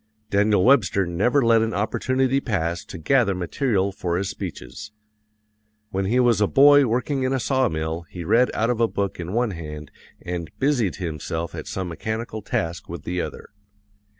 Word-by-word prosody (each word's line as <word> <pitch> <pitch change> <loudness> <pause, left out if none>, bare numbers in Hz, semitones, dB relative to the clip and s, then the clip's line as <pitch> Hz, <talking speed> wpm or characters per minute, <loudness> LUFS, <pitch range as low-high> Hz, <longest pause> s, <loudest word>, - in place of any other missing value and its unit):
Daniel 100 -1 +3
Webster 110 -7 +4
never 115 +10 +1
let 115 -1 +5
an 110 0 -1
opportunity 130 +5 +1
pass 85 -9 -2
to - - -9
gather 105 - +2
material 100 +2 0
for 90 -3 -2
his 95 +1 -2
speeches. 105 0 -8 1.0
When 95 0 -1
he 120 +6 +2
was 120 -3 +3
a 105 - +4
boy 145 +2 +6
working 125 +4 -1
in 130 +1 0
a 135 - +1
sawmill 85 - -1
he 90 - -7
read 120 +9 +3
out 115 +3 +1
of 120 -1 -1
a 115 - +4
book 100 -4 -3
in 85 +1 -5
one 120 -1 +1
hand 75 -4 -8 0.3
and 85 -2 -5
busied 130 -8 +1
himself 80 -1 -4
at - - -7
some 95 -1 -3
mechanical 110 +5 -4
task 85 -4 -3
with 85 -3 -7
the 90 +1 -2
other. - - -7
100 Hz, 175 wpm, -23 LUFS, 85-125 Hz, 1.0 s, boy